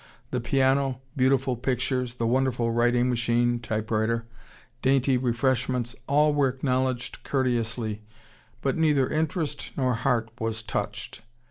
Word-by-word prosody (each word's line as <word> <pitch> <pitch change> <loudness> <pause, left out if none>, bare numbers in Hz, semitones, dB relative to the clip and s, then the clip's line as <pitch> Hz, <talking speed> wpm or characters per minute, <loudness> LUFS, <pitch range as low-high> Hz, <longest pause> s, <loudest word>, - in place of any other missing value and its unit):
The 125 - -1
piano, 135 +1 +2 0.2
beautiful 130 -1 +2
pictures, 125 0 -1
the 115 - -2
wonderful 120 -1 +1
writing 120 +1 +2
machine 120 0 +1
(typewriter), 110 0 -1 0.6
dainty 135 0 +3
refreshments, 125 0 0
all 150 +1 +4
were 145 -2 +3
acknowledged 130 -1 -1
courteously, 115 -5 -1 0.6
but, 135 - +1
neither 150 -5 +3
interest 155 -1 -2
nor 130 -2 +2
heart 115 -1 0
was 110 0 -2
touched. 105 - -4
125 Hz, 115 wpm, -26 LUFS, 120-135 Hz, 0.6 s, all